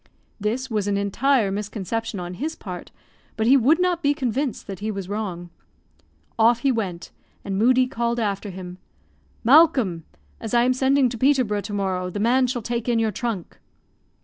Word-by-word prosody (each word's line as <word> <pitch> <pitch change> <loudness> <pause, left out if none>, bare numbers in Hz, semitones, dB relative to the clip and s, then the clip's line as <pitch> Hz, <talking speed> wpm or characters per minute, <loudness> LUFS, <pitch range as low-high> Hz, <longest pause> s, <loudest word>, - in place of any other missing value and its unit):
This 230 +6 -2
was 210 -5 -2
an 200 -1 +1
entire 210 +2 +1
misconception 210 +1 -4
on 175 0 -5
his 310 - -4
part; 180 -3 -8 0.5
but 220 - 0
he 255 +4 +6
would 275 +6 +4
not 360 -1 +1
be 290 -2 +2
convinced 265 -1 -2
that 195 -2 -7
he 215 - -3
was 195 -3 -4
wrong. 185 -4 -5 0.9
Off 230 +1 +4
he 275 - +3
went, 190 -8 -4 0.3
and 195 - -3
Moodie 250 +5 +4
called 235 -1 -2
after 205 -2 -2
him, 180 -1 -8 0.6
"Malcolm, 255 - +4 0.4
as 225 +1 -3
I 235 - +5
am 255 +1 +3
sending 265 +1 +3
to 235 -1 -7
Peterborough 255 -6 +2
to 205 - -7
morrow, 190 -2 -1
the 205 - -5
man 250 +4 +3
shall 245 -2 -3
take 235 +1 -2
in 235 - +2
your 225 -1 +1
trunk." 215 -4 -5
225 Hz, 175 wpm, -23 LUFS, 200-255 Hz, 0.9 s, he